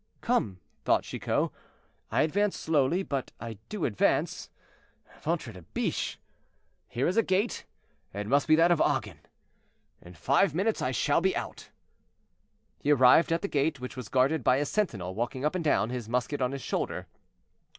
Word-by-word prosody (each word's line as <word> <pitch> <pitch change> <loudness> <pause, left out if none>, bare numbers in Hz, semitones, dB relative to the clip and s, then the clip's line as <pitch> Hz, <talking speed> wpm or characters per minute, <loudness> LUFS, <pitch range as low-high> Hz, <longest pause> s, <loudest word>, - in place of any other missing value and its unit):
"Come," 95 -4 0 0.2
thought - - +2
Chicot, - - -1 0.6
"I - - +2
advance 200 +6 0
slowly, 160 +3 +1
but 140 -7 -4
I 115 -3 -7
do 210 -6 -2
advance. 105 - 0 0.7
Ventre 155 -8 -2
de 90 - -11
biche! 80 - -3 0.7
here 125 - -1
is 185 +5 -1
a - - +7
gate; 200 +3 -1 0.5
it 100 +1 -5
must 140 +6 +2
be 155 - +6
that 165 +2 +4
of 170 - +3
Agen; - - 0 0.8
in 85 0 -13
five 140 - +2
minutes 210 +5 0
I - - 0
shall 145 +4 +1
be 190 +1 +1
out." - - -6 1.1
He 145 - -2
arrived 135 +4 +6
at 165 +3 0
the - - 0
gate, 145 -3 0
which 125 0 -7
was 125 -5 -7
guarded 135 +2 +2
by 125 - +4
a 145 +2 0
sentinel 105 - -2
walking 120 +6 -3
up 150 - +1
and 180 -2 -2
down, 125 -6 +2
his 120 -3 -5
musket 125 +4 -1
on 125 0 +1
his 140 -1 -6
shoulder. - - -3
140 Hz, 170 wpm, -28 LUFS, 125-170 Hz, 1.1 s, a